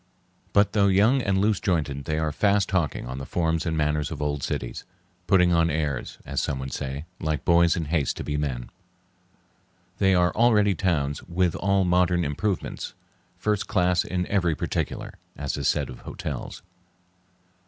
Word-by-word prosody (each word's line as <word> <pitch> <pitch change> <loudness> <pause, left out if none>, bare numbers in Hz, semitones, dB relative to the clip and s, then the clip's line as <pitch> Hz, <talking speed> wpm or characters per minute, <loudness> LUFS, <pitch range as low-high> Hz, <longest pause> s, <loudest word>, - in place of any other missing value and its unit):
But, 100 0 +3
though 100 -2 +4
young 105 +8 +4
and 100 -4 +1
loose 105 0 +2
jointed, 75 -7 -1
they 80 -1 -1
are 80 -1 0
fast 100 +5 +2
taking 85 -6 0
on 65 +2 -5
the 70 - -6
forms 80 0 0
and 80 -1 -1
manners 75 -1 0
of 80 - -6
old 75 -1 -1
cities, - - -4 0.4
putting 90 -1 +4
on 85 0 +3
airs, 75 -4 -2
as - - -1
some 70 - -2
would 65 0 -5
say, 70 +3 -4
like 80 -2 -2
boys 85 0 +5
in 85 -3 -2
haste 75 -3 0
to - - -4
be 75 - -3
men. 70 -5 -3 1.3
They 95 -1 +4
are 90 0 +3
already 105 -3 +4
towns 75 -6 0
"with 90 -1 0
all 100 0 +2
modern 90 -1 +2
improvements, 90 +7 -3 0.4
first 105 -2 -1
class 90 -1 +2
in 90 -1 -2
every 90 -5 +1
particular," - - -3 0.2
as 70 -1 -3
is - - -1
said - - +1
of 65 - -9
hotels. - - -6
85 Hz, 170 wpm, -25 LUFS, 75-95 Hz, 1.3 s, boys